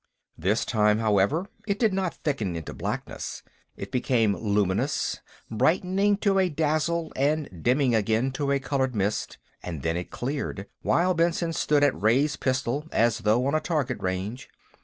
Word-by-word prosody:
This 100 +7 0
time, 105 -1 +3
however, 110 - +2 0.2
it 200 -1 0
did 220 -3 +2
not 190 -2 -1
thicken 110 - -2
into 80 -2 -6
blackness. - - -5 0.3
It 100 0 -7
became 115 -5 +2
luminous, 100 -3 0 0.3
brightening 190 - +2
to 195 -1 +4
a 185 -1 +3
dazzle 155 +2 0
and 140 - -1
dimming 130 - +2
again 110 +4 +1
to 140 +1 -1
a 140 - +3
colored 135 -2 -1
mist, 105 +1 -1 0.2
and 80 -6 -6
then 80 0 0
it 90 0 -4
cleared, 125 -6 -4 0.2
while 180 +2 +2
Benson 170 0 +1
stood 150 -2 +2
at 145 - +2
raise 135 +8 +3
pistol, 135 +3 -1
as 115 0 +2
though 110 +3 +2
on 140 - 0
a 155 - +3
target 145 -7 -1
range. 95 +7 -3
130 Hz, 160 wpm, -26 LUFS, 105-155 Hz, 0.3 s, to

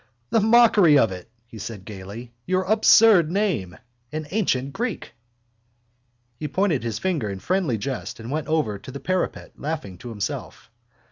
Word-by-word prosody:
—The - - +4
mockery 215 -8 +6
of 115 -7 +3
it! 90 +2 -8 0.2
he 115 -2 -12
said 100 -2 -7
gaily. 105 +4 -9
Your 185 +1 +1
absurd 210 -3 +6
name, 175 - -1 0.3
an 155 0 -4
ancient 140 -10 0
Greek! 230 - -4 1.3
He 150 - -3
pointed 165 -1 +1
his 115 -2 -3
finger 155 - -1
in 100 - -4
friendly 170 - 0
jest 130 +3 -5
and 115 +3 -7
went 150 -2 -2
over 150 -11 0
to 130 - -10
the 140 - -7
parapet, 185 +3 -2
laughing 140 - -5
to 120 - -8
himself. 105 +1 -5
145 Hz, 155 wpm, -23 LUFS, 110-185 Hz, 1.3 s, mockery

